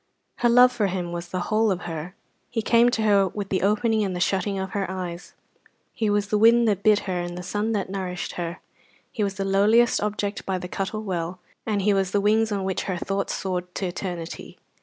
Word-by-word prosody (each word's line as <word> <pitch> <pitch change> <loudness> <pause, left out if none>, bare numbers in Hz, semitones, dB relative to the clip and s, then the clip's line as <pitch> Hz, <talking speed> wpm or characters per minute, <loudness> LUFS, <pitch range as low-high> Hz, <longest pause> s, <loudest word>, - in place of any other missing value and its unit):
Her 240 - +2
love 250 +1 +7
for 210 -5 0
him 180 -2 -3
was 175 0 -5
the 185 +1 -3
whole 220 +3 +1
of 185 -2 -1
her. 165 +2 -6 0.3
He 225 -2 -2
came 235 +2 +5
to 225 -3 -1
her 200 -2 +4
with 200 +1 -5
the 190 - 0
opening 215 +2 +2
and 190 -2 -2
the - - -3
shutting 195 +2 0
of 190 0 -4
her 195 -4 -2
eyes; 180 -2 -6 0.6
he 220 -2 0
was 205 -1 +1
the 210 - +2
wind 230 +1 +6
that 200 -3 +1
bit 210 0 +4
her 185 -2 -3
and 175 0 -4
the 180 - -6
sun 210 +4 -1
that 200 -3 -1
nourished 185 -2 -4
her; 170 -1 -5 0.5
he 215 - -2
was 200 -1 -1
the 195 -1 -2
lowliest 210 +5 +4
object 205 -1 -2
by 190 -1 -1
the 180 - -6
Cuttle 195 +4 -3
Well, 180 -2 -3 0.3
and 205 -3 0
he 205 +1 +3
was 195 -1 +1
the 205 - +1
wings 215 +2 +2
on 200 -2 -1
which 190 -1 -2
her 185 -2 -2
thoughts 195 +3 -2
soared 180 -1 -4
to 195 - -2
eternity. 175 -2 -6
195 Hz, 225 wpm, -24 LUFS, 180-215 Hz, 0.6 s, love